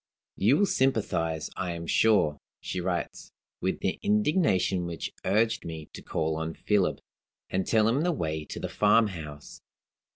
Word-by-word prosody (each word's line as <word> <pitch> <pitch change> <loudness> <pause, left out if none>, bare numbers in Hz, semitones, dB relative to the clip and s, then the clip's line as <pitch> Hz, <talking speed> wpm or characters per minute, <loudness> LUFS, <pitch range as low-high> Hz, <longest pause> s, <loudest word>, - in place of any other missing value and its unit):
"You 115 +9 +4
will 205 - +4
sympathize, 85 - 0
I 90 -2 -2
am 85 0 -6
sure" 85 -7 +3 0.2
(she 90 - -4
writes), 90 -1 -3 0.3
"with 95 - -1
the 95 - -1
indignation 150 - +2
which 85 -1 -5
urged 110 +3 +2
me 80 -2 -7
to - - -8
call 80 0 -1
on 80 0 -3
Philip, 105 -3 +1 0.5
and 95 0 0
tell 110 -1 +4
him 125 +6 +2
the 175 +2 +2
way 80 - -2
to - - -7
the - - -3
farmhouse. 95 -9 0
95 Hz, 155 wpm, -28 LUFS, 80-110 Hz, 0.5 s, You